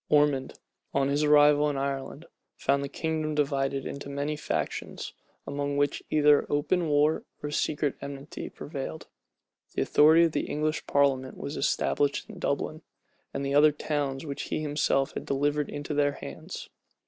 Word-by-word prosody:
Ormond, 145 -3 +2 0.4
on 140 0 +2
his 145 +2 +1
arrival 150 0 +6
in 145 - -2
Ireland, 140 +3 -3 0.3
found 140 0 +1
the 140 - -4
kingdom 155 0 -2
divided 140 -2 0
into 140 0 -6
many 145 +2 -2
factions, 150 - -3 0.3
among 140 0 -2
which 145 0 +1
either 150 -1 +4
open 155 +3 +1
war 150 +2 +3 0.2
or 145 - -3
secret 150 -1 0
enmity 140 +1 -7
prevailed. 145 +2 -6 0.7
The - - +2
authority 160 +3 +6
of 165 - +3
the - - -1
English 155 +1 -1
parliament 135 -2 +2
was 140 - -5
established 145 -1 0
in - - -10
Dublin, - - -2 0.5
and 140 0 -3
the 140 - -1
other 150 +1 +7
towns 145 -2 -2
which 140 -2 -5
he - - -1
himself 145 -2 +1
had - - -4
delivered 145 +1 0
into 145 +1 -4
their 145 -1 +2
hands. - - -8
145 Hz, 155 wpm, -28 LUFS, 140-150 Hz, 0.7 s, other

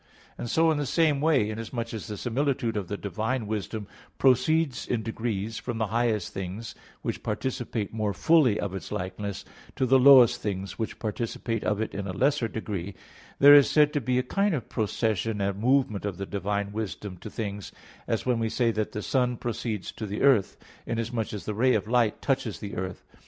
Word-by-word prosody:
And 120 - -5
so 165 +4 +4
in 150 - 0
the 145 - -2
same 155 -3 +2
way, 145 -9 +3
inasmuch 115 +1 -5
as 110 - -5
the 105 - -5
similitude 120 0 -1
of 100 -4 -2
the 100 +3 -4
divine 110 +6 -2
wisdom 105 0 -4 0.3
proceeds 135 +2 +2
in 115 -3 -1
degrees 110 -1 -3
from 120 - -4
the 110 - +1
highest 115 -5 0
things, 95 +4 -5 0.3
which - - -3
participate 120 -5 -3
more 110 -2 -1
fully 125 - +3
of 100 -2 -3
its 95 - -6
likeness, 100 +2 -4 0.3
to 130 - +1
the 130 +1 +5
lowest 125 -2 +7
things 100 0 -4
which 110 - -3
participate 115 0 -3
of 105 -1 0
it 110 - -3
in 100 0 -4
a 95 - -4
lesser 135 +2 +2
degree, 100 -4 -5 0.4
there 145 +1 +9
is 145 -2 +8
said 150 -1 +4
to 145 - 0
be 125 +1 0
a 125 - +2
kind 195 +7 +1
of 125 -8 -5
procession 110 -1 -1
and 100 0 -1
movement 130 -2 +2
of 100 -3 -3
the 100 - -4
divine 100 +1 -2
wisdom 105 -2 -5
to 110 - -9
things; 100 -2 -5 0.4
as 115 - -1
when 125 -2 +1
we 115 -1 0
say 115 0 +1
that 110 -1 -2
the 105 - -4
sun 125 -2 +1
proceeds 110 -4 -3
to 110 - -6
the 100 +2 -3
earth, 130 -8 +4 0.3
inasmuch 115 -1 -2
as 105 - -6
the 105 - -2
ray 125 +4 +3
of 105 0 -1
light 120 -2 +1
touches 130 -6 0
the 100 -1 -7
earth. 95 0 -5
115 Hz, 200 wpm, -27 LUFS, 105-125 Hz, 0.4 s, there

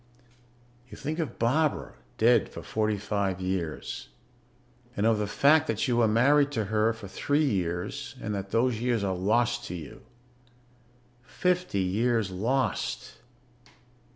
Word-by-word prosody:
You - - -10
think 155 +4 -4
of 160 - -3
Barbara 145 +6 +1 0.2
dead - - +4
for - - -9
forty 110 -1 0
five 100 -2 -1
years. 90 -8 -4 0.9
And 100 - +1
of 115 -1 +3
the 105 - -1
fact 150 +8 +4
that 150 - 0
you 120 -2 +1
were 115 -2 +4
married 140 +6 +4
to 110 -4 -1
her 110 +1 +3
for 110 -3 -8
three 145 +10 0
years 90 -7 -2
and 105 - -4
that 100 -1 -4
those 115 0 +1
years 120 -4 +1
are 95 -1 0
lost 120 +6 +1
to 90 - -5
you. 80 -5 -9 1.2
Fifty 175 - 0
years 110 +2 +1
lost. 120 +8 -1
110 Hz, 140 wpm, -28 LUFS, 100-130 Hz, 1.2 s, dead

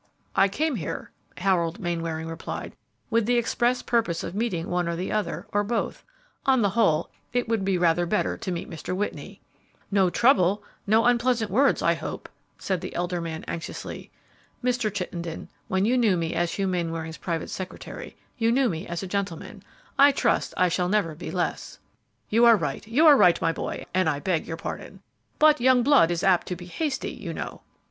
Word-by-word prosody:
"I 195 - +5
came 290 +7 -1
here," 160 - -5 0.3
Harold 180 -1 +1
Mainwaring 165 -3 -3
replied, 165 0 -6 0.4
"with 230 -1 +2
the 245 0 +3
express 240 +1 +1
purpose 220 -9 0
of - - -5
meeting 195 -6 -2
one 180 -1 0
or 170 - -1
the 180 +3 -3
other, 215 -1 -2
or 205 0 +2
both; 230 +3 -2 0.4
on 260 -4 +3
the 200 - +2
whole, 185 -8 +2 0.2
it 245 -1 0
will 225 0 +1
be 195 -1 0
rather 175 0 +2
better 210 +4 0
to 185 - -5
meet 170 - -4
Mr. 165 +2 -5
Whitney." 205 +2 -4 0.5
"No 195 -2 +4
trouble, 205 -3 +3 0.2
no 220 +3 +4
unpleasant 240 -3 +2
words, 270 +7 +3
I - - +4
hope?" - - -6 0.3
said 185 -3 -2
the - - -7
elder 175 0 -1
man, 160 -1 -5
anxiously. 165 -1 -6 0.5
"Mr. 245 -3 +1
Chittenden, 175 -4 -5 0.2
when 190 +1 +1
you 245 +4 +3
knew 210 -6 +3
me 165 0 -2
as 170 0 0
Hugh 195 -1 -1
Mainwaring's 165 -3 -3
private 165 -2 -3
secretary, 185 -1 -7 0.2
you 230 0 +3
knew 260 0 +3
me 160 -2 -4
as 170 +1 -4
a - - -4
gentleman; 190 -3 -4 0.4
I 285 +1 +8
trust - - 0
I 185 - +4
shall 180 +1 0
never 200 -6 +1
be 155 - -7
less." - - -3 0.5
"You 230 +3 +4
are 230 -2 +8
right, 150 +3 -4
you 265 +9 +3
are 300 -2 +9
right, 180 -9 +5
my 165 - +1
boy, - - -5
and 185 -3 +2
I 145 -2 -1
beg 165 +1 -1
your 165 - -4
pardon; - - -7 0.3
but 305 -3 +5
young 255 -1 +5
blood 275 - +5
is 170 -1 -1
apt 185 -3 +3
to 180 - -3
be 175 0 -10
hasty, 270 - -3
you - - -7
know." - - -6
190 Hz, 190 wpm, -26 LUFS, 170-230 Hz, 0.5 s, are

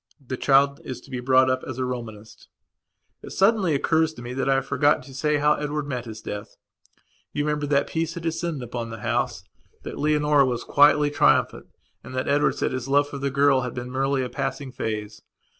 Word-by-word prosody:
The 130 -2 -5
child 140 +1 +3
is 125 -2 -6
to 140 - -17
be 125 - -3
brought 130 +1 +4
up 130 0 0
as 130 - -6
a 130 - -1
Romanist. 110 -4 -7 0.7
It - - -9
suddenly 195 -5 +2
occurs 160 +2 +1
to 120 - -10
me 120 +1 -6
that 135 +1 -1
I 135 - +4
have 135 0 0
forgotten 140 0 +2
to 135 +1 -13
say 150 +3 +1
how 150 +1 +3
Edward 150 0 -3
met 125 -4 -4
his 110 -1 -8
death. 105 0 -7 0.8
You 145 - -1
remember 150 -1 -1
that 140 0 +2
peace 165 +1 -3
had 170 - -6
descended 165 -3 -2
upon 120 -1 -5
the 110 -1 -8
house; - - -1 0.4
that - - -7
Leonora 150 -2 +3
was 120 -2 -2
quietly 145 0 +4
triumphant 145 - +2 0.4
and 130 - -9
that 130 - -2
Edward 145 -1 +2
said - - -1
his 130 0 -4
love 145 +1 +2
for 140 - -6
the 140 0 -1
girl 140 -1 +3
had 125 -1 -5
been 125 0 -5
merely 135 0 0
a - - -2
passing 135 +1 -4
phase. 110 -3 -5
135 Hz, 210 wpm, -24 LUFS, 125-150 Hz, 0.8 s, brought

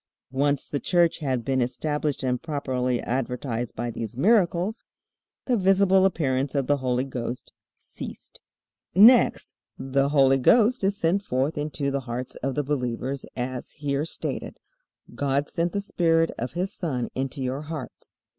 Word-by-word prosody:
Once 140 +1 +1
the 145 - -2
Church 170 0 +2
had 130 -6 -2
been 130 -1 +1
established 145 +3 -2
and 125 -1 0
properly 130 -5 -1
advertised 125 -1 -3
by 120 0 -3
these 115 +1 -6
miracles, 190 - +2 0.6
the 250 - +2
visible 190 -1 +4
appearance 140 -6 0
of 140 -2 +1
the 145 +2 +2
Holy 125 -1 0
Ghost 125 -2 -5 0.2
ceased. - - -10 0.6
Next, 230 +5 +6 0.2
the 135 +1 0
Holy 135 -2 +4
Ghost 230 - +4
is 195 +1 +1
sent 175 +3 +1
forth 135 -2 -1
into 145 -1 -2
the 140 - 0
hearts 125 +2 -4
of 135 0 -3
the 145 - 0
believers, 130 -1 -3
as 125 0 -4
here 145 -1 -2
stated, 165 - -5 0.6
"God 140 +1 0
sent 170 +1 -1
the 200 - -1
Spirit 165 -4 +2
of 125 - -5
his 180 +3 -2
Son 130 -9 -2
into 135 +2 -3
your 130 +2 -2
hearts." 150 -5 -8
140 Hz, 150 wpm, -25 LUFS, 130-165 Hz, 0.6 s, Next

